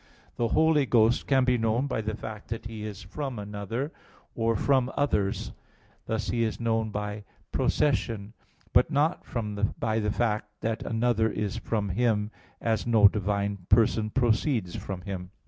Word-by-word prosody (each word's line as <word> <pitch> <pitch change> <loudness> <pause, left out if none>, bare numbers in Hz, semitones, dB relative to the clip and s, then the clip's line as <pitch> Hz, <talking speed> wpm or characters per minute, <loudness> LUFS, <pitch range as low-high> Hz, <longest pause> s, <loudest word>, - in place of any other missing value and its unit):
The 120 - +1
Holy 155 +1 +3
Ghost 115 0 +3
can 135 -2 +4
be 125 -1 +2
known 115 +4 +1
by 125 -5 -1
the 110 0 -3
fact 110 -1 -8
that 115 0 -5
He 110 -1 -6
is 105 -2 -6
from 130 +6 -5
another, 105 - -4 0.4
or 115 0 +1
from 130 +2 +2
others; 105 -9 0 0.6
thus 110 -1 -2
He 115 -1 +1
is 110 - -2
known 115 -1 0
by 105 0 -4 0.3
"procession"; 115 -7 0 0.4
but - - +5
not 150 +4 +1 0.6
by 110 -1 +1
the 105 -1 0
fact 105 -2 0
that 110 0 -1
another 115 -1 +1
is 105 +1 -2
from 105 -2 -2
Him, 105 +1 +1 0.3
as 115 0 0
no 110 -3 +7
divine 100 -2 -1
person 110 -1 +4
proceeds 115 - +1
from 95 -2 -5
Him. 90 -1 -6
110 Hz, 155 wpm, -28 LUFS, 105-120 Hz, 0.6 s, no